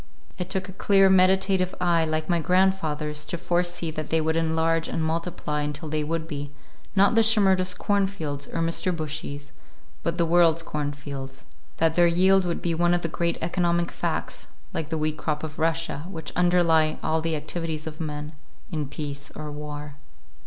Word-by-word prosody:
It 180 0 -3
took 190 0 -2
a - - -8
clear, 195 0 +4
meditative 190 0 +3
eye 170 -2 +3
like 155 0 -2
my 175 -1 +2
grandfather's 160 -4 +1
to 175 - -4
foresee 175 -1 -1
that 155 -1 -5
they 160 - +2
would 160 0 0
enlarge 165 0 +1
and 165 - -2
multiply 160 -2 -2
until 150 +2 -4
they 155 0 -1
would 165 +1 -2
be, 145 -3 -5 0.5
not 200 +3 +5
the 225 - +5
Shimerdas' 190 -5 +4
cornfields, 190 -9 -1
or 165 - -3
Mr. 165 +2 +1
Bushy's, 145 -2 -5 0.5
but 170 0 -2
the 170 - +3
world's 165 -1 +4
cornfields; 145 -3 -5 0.3
that 160 -1 +3
their 175 +1 +5
yield 185 +2 +4
would 170 -1 -2
be 170 - +1
one 175 +1 +3
of 175 - -2
the 165 - -1
great 170 +1 -1
economic 170 0 +1
facts, - - -3 0.3
like 160 -1 -3
the 160 - -1
wheat 155 0 -1
crop 150 -1 -2
of 155 0 -6
Russia, 165 -1 -1
which 160 -6 -7
underlie 165 -3 +3
all 160 0 +1
the 165 0 -1
activities 155 0 -4
of 160 0 -6
men, 150 0 -5 0.4
in 155 -4 -2
peace 140 -1 -5
or 150 -1 -6
war. 145 0 -7
165 Hz, 175 wpm, -25 LUFS, 150-175 Hz, 0.5 s, not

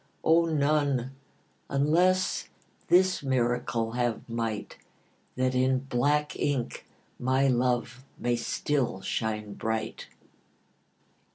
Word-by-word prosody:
O, 165 +1 +5
none, 145 -4 +1 0.6
unless 175 +7 +2 0.4
this 185 +1 +4
miracle 120 -3 0
have 120 -1 -1
might, 115 -3 -4 0.6
That 130 0 +1
in 130 +1 +3
black 145 +3 0
ink 135 -5 -2 0.3
my 130 +2 +2
love 125 0 0
may 120 0 0
still 120 -2 -1
shine 105 -1 -2
bright. 110 +2 -3
130 Hz, 90 wpm, -28 LUFS, 120-145 Hz, 0.6 s, O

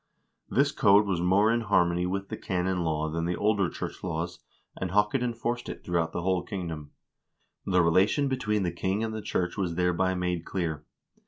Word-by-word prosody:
1 - - -6
This - - +4
code 100 +1 +5
was 95 -4 -1
more 100 +5 +4
in 120 0 +1
harmony 90 -5 +2
with 95 +1 -3
the - - -3
canon 90 -2 -1
law 80 -1 0
than 80 +1 -2
the 90 +1 0
older 100 -3 +2
church - - -6
laws, 85 -1 -3 0.4
and 95 - -3
Haakon 105 +6 +2
enforced 120 0 -2
it - - -7
throughout 85 -2 0
the 85 - -3
whole 95 -1 +1
kingdom. 85 -5 -5 0.8
The 90 -2 +4
relation 95 - +3
between 110 -6 0
the 90 - 0
king 95 +5 -1
and 110 -1 -2
the 110 - -4
church 90 -2 -2
was 90 -4 -1
thereby 90 +1 +1
made 90 -2 -1
clear. 80 -6 -3
90 Hz, 190 wpm, -28 LUFS, 85-105 Hz, 0.8 s, code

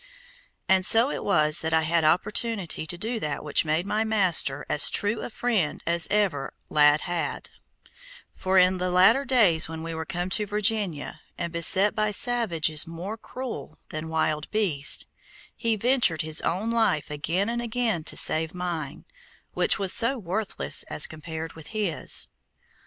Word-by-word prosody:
And 190 0 +3
so 230 +7 +6
it - - -5
was 155 -6 +2
that 160 0 -1
I 160 - +2
had 165 +1 0
opportunity 195 +1 -1
to 175 - -4
do 225 +5 -4
that 150 -6 -5
which 150 - +2
made 160 +3 -1
my 210 +2 -1
master 185 -10 +1
as 150 - +6
true 210 +2 0
a - - -6
friend 220 -9 -2
as 170 0 +3
ever 185 -10 -1 0.2
lad 150 0 +4
had, 175 -1 -4 0.8
for 190 0 -1
in 185 0 +3
the 180 0 -2
later 185 +10 +3
days 210 -13 +3
when 160 0 -7
we 165 0 -6
were 160 0 -6
come 180 0 -4
to 210 +2 0
Virginia 205 -6 -1 0.2
and 170 0 -5
beset 190 +4 +5
by 215 0 -1
savages 195 - +1
more 175 +6 -7
cruel 255 +2 -9
than 155 +1 -7
wild 155 -1 -2
beasts, 175 -10 +1 0.5
he 230 -2 -1
ventured 230 - +1
his 155 0 0
own 200 +7 -2
life 220 -11 0
again 165 +7 -2
and 235 +1 -3
again 230 -7 -2
to - - -3
save 160 +2 +2
mine, 170 -6 -6 0.5
which - - +3
was 195 -2 0
so 235 +4 +3
worthless 185 - -2
as 75 - 0
compared 160 +1 -8
with 160 -2 -13
his. 205 -8 0
180 Hz, 165 wpm, -24 LUFS, 160-215 Hz, 0.8 s, so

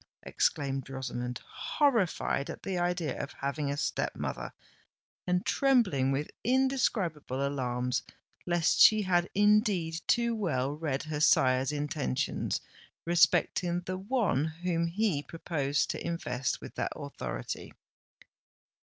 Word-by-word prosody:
exclaimed 135 -2 -1
Rosamond, 125 -2 -4
horrified 225 - 0
at - - -7
the 190 - -2
idea 175 -4 -1
of 140 - -6
having 140 +1 -2
a 140 - -2
step - - -1
mother, - - -4 0.8
and 180 0 +1
trembling 215 - +3
with 140 +2 -2
indescribable 210 - +1
alarms 125 -3 -1 0.5
lest 175 -2 +2
she 215 -1 +8
had 175 -2 +2
indeed 205 -5 +3
too 235 0 +2
well 140 - 0
read 150 -3 -2
her 155 -1 -4
sire's 130 -2 +4
intentions 145 -2 -2 0.4
respecting 175 +1 +3
the 185 +1 -4
one 200 - +1
whom 170 +1 -1
he 180 -4 0
proposed 145 -3 -1
to - - -5
invest 150 -7 -2
with - - -9
that - - -2
authority. - - -6
160 Hz, 120 wpm, -30 LUFS, 140-185 Hz, 0.8 s, she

